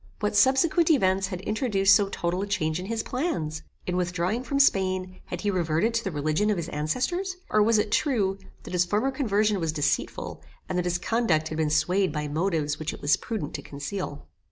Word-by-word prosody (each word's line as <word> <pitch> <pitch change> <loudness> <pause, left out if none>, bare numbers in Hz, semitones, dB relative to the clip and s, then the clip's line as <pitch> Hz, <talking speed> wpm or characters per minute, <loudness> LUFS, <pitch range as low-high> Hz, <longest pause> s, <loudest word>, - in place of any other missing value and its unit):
What 210 -1 -1
subsequent 270 +9 +4
events 190 - +3
had 185 -2 -5
introduced 205 -2 +3
so 205 -2 +2
total 175 -1 -2
a 200 - -3
change 160 -4 -1
in 185 - -6
his 225 0 -2
plans? 160 - -2 0.2
In 180 - -2
withdrawing 180 +5 -1
from 275 +2 -1
Spain, 185 -7 +2
had 175 -1 -5
he 205 - +1
reverted 175 +4 +1
to 230 0 0
the 195 - -2
religion 155 +6 0
of 210 - +1
his 170 -1 -4
ancestors; 260 - -1 0.2
or 215 - +4
was 220 +1 +4
it 210 0 0
true, 200 -9 +1 0.2
that - - -9
his 180 -1 +3
former 210 +9 0
conversion 215 -6 +1
was 165 -2 0
deceitful, 150 -2 -2 0.3
and - - -3
that 180 0 0
his 175 0 +1
conduct 175 -6 +1
had 155 - -4
been 155 -1 +1
swayed 180 +6 +2
by 150 -1 -3
motives 155 -1 -1
which 155 -1 -3
it - - -14
was 145 +1 +4
prudent 210 -11 -5
to - - -4
conceal? 145 - -6
190 Hz, 205 wpm, -26 LUFS, 160-215 Hz, 0.3 s, subsequent